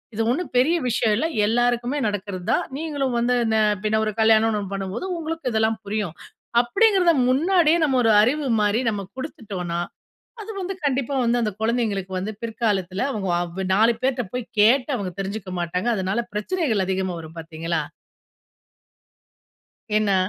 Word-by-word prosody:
இது 225 Hz, -, -1 dB
ஒண்ணும் 330 Hz, +8 st, -2 dB
பெரிய 285 Hz, +8 st, +4 dB
விஷயம் 225 Hz, -2 st, +2 dB
இல்ல. 280 Hz, -, 0 dB, 0.2 s
எல்லாருக்குமே 240 Hz, +4 st, +1 dB
நடக்கிறது 200 Hz, -3 st, -4 dB
தான். -, -, +1 dB
நீங்களும் 285 Hz, -5 st, -2 dB
வந்து 240 Hz, +1 st, +2 dB
இந்த 220 Hz, 0 st, +2 dB, 0.3 s
பின்ன 215 Hz, 0 st, +1 dB
ஒரு 215 Hz, -, -1 dB
கல்யாணம்னு 220 Hz, 0 st, +4 dB
ஒண்ணு 200 Hz, -1 st, -6 dB
பண்ணும்போது 195 Hz, -, -4 dB
உங்களுக்கு 325 Hz, -3 st, -3 dB
இதெல்லாம் 220 Hz, 0 st, +1 dB
புரியும், 200 Hz, -5 st, -3 dB, 0.5 s
அப்படிங்கிறத 370 Hz, -, +3 dB, 0.2 s
முன்னாடியே 330 Hz, +4 st, +3 dB
நம்ம 270 Hz, -4 st, +2 dB
ஒரு 225 Hz, -, +4 dB
அறிவு 275 Hz, +6 st, +1 dB
மாரி 210 Hz, +2 st, +2 dB
நம்ம 205 Hz, -2 st, -2 dB, 0.2 s
குடுத்துட்டோனா, 195 Hz, -, -5 dB, 0.6 s
அது 430 Hz, +1 st, -7 dB
வந்து 380 Hz, +1 st, -3 dB
கண்டிப்பா 275 Hz, 0 st, 0 dB
வந்து 240 Hz, +1 st, +2 dB
அந்த 215 Hz, -2 st, 0 dB
குழந்தைகளுக்கு 220 Hz, -5 st, -1 dB
வந்து 200 Hz, +4 st, -3 dB
பிற்காலத்துல, 205 Hz, -5 st, -1 dB
அவங்க 205 Hz, -6 st, -3 dB
அவ் 175 Hz, +2 st, -5 dB
நாலு 225 Hz, +3 st, +4 dB
பேர்ட 260 Hz, -1 st, +1 dB
போய் 250 Hz, -2 st, -3 dB
கேட்டு 250 Hz, +6 st, +5 dB
அவங்க 195 Hz, -4 st, -4 dB
தெரிஞ்சுக்க 195 Hz, 0 st, -4 dB
மாட்டாங்க. 180 Hz, +6 st, -1 dB
அதனால, 190 Hz, +4 st, 0 dB
பிரச்சனைகள் 220 Hz, -, 0 dB
அதிகமா 190 Hz, -1 st, -1 dB
வரும், 160 Hz, 0 st, -11 dB
பார்த்தீங்களா. 165 Hz, 0 st, -3 dB, 2.2 s
ஏன்னா 210 Hz, -2 st, +2 dB
220 Hz, 150 wpm, -23 LUFS, 195-260 Hz, 2.2 s, கேட்டு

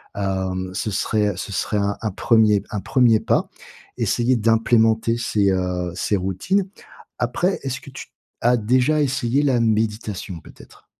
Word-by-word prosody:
Hem, 95 Hz, -2 st, -2 dB
ce 105 Hz, +3 st, -3 dB
serait 105 Hz, +1 st, 0 dB
ce 100 Hz, -, -6 dB
serait 105 Hz, -, -1 dB
un 100 Hz, 0 st, 0 dB
un 110 Hz, -, -2 dB
1er 110 Hz, -1 st, +3 dB
un 105 Hz, -3 st, -4 dB
1er 120 Hz, -3 st, +3 dB
pas. -, -, 0 dB, 0.5 s
Essayer 120 Hz, +2 st, +1 dB
d'implémenter 115 Hz, 0 st, +2 dB
ces, 105 Hz, -4 st, +1 dB
heu, 90 Hz, -1 st, -2 dB
ces 100 Hz, +3 st, 0 dB
routines. 95 Hz, -, -1 dB, 0.5 s
Après, 130 Hz, +11 st, 0 dB
est-ce 135 Hz, -1 st, -3 dB
que 140 Hz, -, -12 dB
tu 135 Hz, -, -9 dB, 0.3 s
as 120 Hz, +1 st, +3 dB
déjà 125 Hz, +7 st, +2 dB
essayé 130 Hz, 0 st, 0 dB
la 130 Hz, -4 st, +2 dB
méditation, 105 Hz, -5 st, -1 dB
peut-être? -, -, -17 dB
110 Hz, 145 wpm, -21 LUFS, 100-120 Hz, 0.5 s, 1er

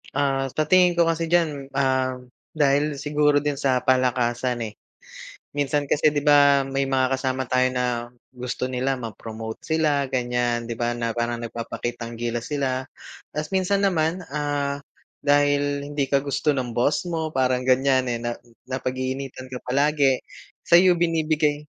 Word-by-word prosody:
Ah, 135 Hz, -1 st, 0 dB
sa 155 Hz, +2 st, -1 dB
tingin 180 Hz, +1 st, +5 dB
ko 170 Hz, -1 st, +2 dB
kasi 165 Hz, 0 st, 0 dB
diyan, 150 Hz, -6 st, +1 dB
ah, 130 Hz, -1 st, 0 dB, 0.3 s
dahil 145 Hz, -1 st, +1 dB
siguro 150 Hz, 0 st, +2 dB
din 145 Hz, 0 st, -1 dB
sa 135 Hz, -2 st, +1 dB
palakasan, 125 Hz, -1 st, +1 dB
eh. 105 Hz, -, -10 dB, 0.8 s
Minsan 145 Hz, 0 st, 0 dB
kasi 150 Hz, +2 st, +3 dB
'di 145 Hz, -, 0 dB
ba 145 Hz, -2 st, +5 dB
may 135 Hz, 0 st, 0 dB
mga 135 Hz, -1 st, +1 dB
kasama 130 Hz, -1 st, -2 dB
tayo 130 Hz, +1 st, +3 dB
na 125 Hz, -1 st, -2 dB, 0.2 s
gusto 125 Hz, 0 st, -3 dB
nila 130 Hz, +1 st, -1 dB
ma-promote 110 Hz, -1 st, -7 dB
sila, 150 Hz, -4 st, +1 dB
ganyan, 120 Hz, -2 st, -1 dB
'di 115 Hz, -, -4 dB
ba, 120 Hz, +1 st, -1 dB
na 115 Hz, -1 st, -3 dB
parang 120 Hz, 0 st, -1 dB
nagpapakitang 115 Hz, 0 st, -5 dB
gilas 120 Hz, +2 st, -3 dB
sila. 130 Hz, -3 st, -1 dB, 0.5 s
Tapos 150 Hz, 0 st, -3 dB
minsan 190 Hz, +1 st, +2 dB
naman, 180 Hz, -1 st, +1 dB
ah, 145 Hz, -1 st, -2 dB, 0.4 s
dahil 145 Hz, 0 st, +2 dB
hindi 145 Hz, -1 st, -1 dB
ka 140 Hz, -, +4 dB
gusto 140 Hz, +2 st, 0 dB
ng 125 Hz, -5 st, -3 dB
boss 145 Hz, +8 st, +1 dB
mo 160 Hz, -2 st, -2 dB
parang 130 Hz, -2 st, +1 dB
ganyan, 130 Hz, 0 st, +2 dB
eh, 120 Hz, -, -2 dB
na 120 Hz, 0 st, -3 dB, 0.3 s
napag-iinitan 130 Hz, 0 st, -4 dB
ka 130 Hz, -1 st, -6 dB
palagi, 140 Hz, 0 st, +2 dB, 0.5 s
sa'yo 175 Hz, 0 st, +6 dB
binibigay 155 Hz, -3 st, +1 dB
135 Hz, 150 wpm, -24 LUFS, 125-145 Hz, 0.8 s, sa'yo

